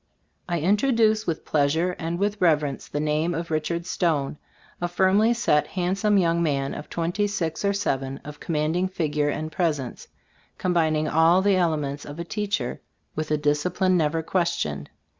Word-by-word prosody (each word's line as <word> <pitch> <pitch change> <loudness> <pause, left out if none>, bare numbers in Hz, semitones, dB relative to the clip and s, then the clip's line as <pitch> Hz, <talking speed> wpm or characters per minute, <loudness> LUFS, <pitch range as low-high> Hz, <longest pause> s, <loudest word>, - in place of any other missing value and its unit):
I 175 - 0
in 185 +7 +3
troduce 220 -3 +2
with 165 -2 -2
pleasure 160 +5 +1
and 165 0 -2
with 205 +2 -1
rev 160 -4 +4
erence 140 -3 -5
the 145 - -2
name 155 +3 0
of 170 +1 -4
Richard 170 +2 -1
Stone; 150 -6 -1 0.4
a 175 - +1
firmly 190 +5 +3
set, 150 -11 +2
handsome 195 +4 +1
young 170 -2 +2
man 140 -4 0
of 150 - -8
twenty 175 +5 -1
six 165 -5 -3
or 200 - +3
seven, 135 -9 -2
of 150 0 -9
commanding 165 +3 0
figure 150 -5 -1
and 155 +2 -3
presence, 150 -9 -2 0.5
combining 160 -4 +1
all 165 +4 +4
the 200 -1 +4
elements 150 -5 0
of 145 +1 -9
a 170 - -3
teacher 200 - -3 0.3
with 155 0 -3
a 150 - +2
disci 150 +4 0
pline 185 -1 +3
never 160 -1 +1
questioned. 155 - -1
165 Hz, 170 wpm, -25 LUFS, 150-185 Hz, 0.5 s, rev